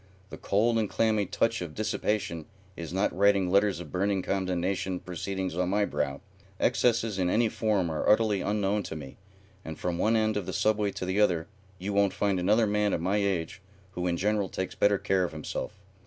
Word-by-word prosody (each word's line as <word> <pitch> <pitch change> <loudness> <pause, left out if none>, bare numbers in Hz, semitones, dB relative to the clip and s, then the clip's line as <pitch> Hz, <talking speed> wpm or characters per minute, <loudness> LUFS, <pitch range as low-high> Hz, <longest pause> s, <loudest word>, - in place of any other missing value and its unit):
The - - -7
cold 115 +3 +2
and 105 -3 -1
clammy 110 -3 +1
touch 115 +3 0
of 85 -3 -6
dissipation 105 -6 -2 0.3
is 85 -1 -6
not 95 +1 0
writing 100 -1 +3
letters 100 -1 +3
of 80 -5 -9
burning 95 +2 0
condemnation 95 -1 -1
proceedings 95 +1 -4
on 90 0 0
my 100 +1 +2
brow. 70 -6 -2 0.4
Excesses 115 -4 +1
in 90 -1 +1
any 115 +4 +3
form 105 -7 0
are 80 - -1
utterly 105 -2 +3
unknown 105 0 0
to 85 - -6
me, 70 -4 -9 0.5
and 80 -1 -7
from 90 -1 -2
one 110 +4 +3
end 110 -1 +1
of 100 - -4
the - - -4
Subway 105 -1 +1
to - - -4
the 95 +3 +1
other 85 -5 +2 0.3
you 95 +3 -4
won't 100 -1 +3
find 100 -2 0
another 105 +5 +3
man 105 -1 +1
of - - 0
my 95 +4 +1
age 95 -2 -1 0.3
who 90 0 -3
in 85 -1 0
general 105 +1 0
takes 95 -1 -4
better 100 0 +3
care 95 -1 +1
of 85 - -3
himself. 75 -1 -5
100 Hz, 200 wpm, -28 LUFS, 90-105 Hz, 0.5 s, writing